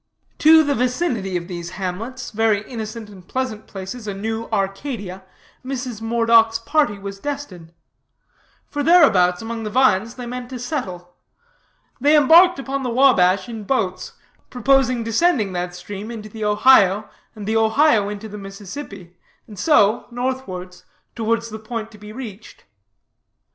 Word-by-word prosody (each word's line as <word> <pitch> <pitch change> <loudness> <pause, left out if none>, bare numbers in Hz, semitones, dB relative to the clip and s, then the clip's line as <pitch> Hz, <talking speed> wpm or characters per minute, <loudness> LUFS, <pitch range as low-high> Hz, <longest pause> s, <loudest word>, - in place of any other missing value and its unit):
To 315 +1 +7
the 285 -1 0
vicinity 245 - -1
of 170 0 -7
those 175 -2 -6
hamlets, 215 +7 -5
very 215 -1 +1
innocent 220 -2 -6
and 190 -3 -15
pleasant 255 -5 -4
places, 205 +4 -8
a 200 - -3
new 225 +3 -4
Arcadia, 195 -1 -3 0.4
Mrs. 255 -4 -5
Moredock's 230 0 +3
party 230 -1 0
was 195 0 -8
destined; 210 - -6 1.0
for 290 - -3
thereabouts, 225 - +4
among 230 0 -5
the 215 - -4
vines, 230 -2 +2
they 250 - -7
meant 245 0 -6
to 260 - -6
settle. 190 - -5 0.9
They 295 +4 +5
embarked 335 +5 +6
upon 275 0 -3
the 255 - -2
Wabash 200 -8 +4
in 225 -3 -7
boats, 185 -6 -2 0.4
proposing 255 -1 +2
descending 225 - +1
that 180 0 -3
stream 205 +3 -8
into 215 -2 -8
the 220 0 -5
Ohio, 210 -2 +4 0.3
and 210 -2 -8
the 220 +1 +1
Ohio 220 -1 +3
into 210 +1 -6
the 210 0 -9
Mississippi, 195 -2 -9 0.3
and 210 -4 -12
so, 215 - +3
northwards, 240 -8 -5 0.3
towards 230 0 -1
the 220 - -6
point 220 0 -6
to 210 - -15
be 210 0 -10
reached. 215 -3 -10
225 Hz, 145 wpm, -21 LUFS, 195-255 Hz, 1.0 s, To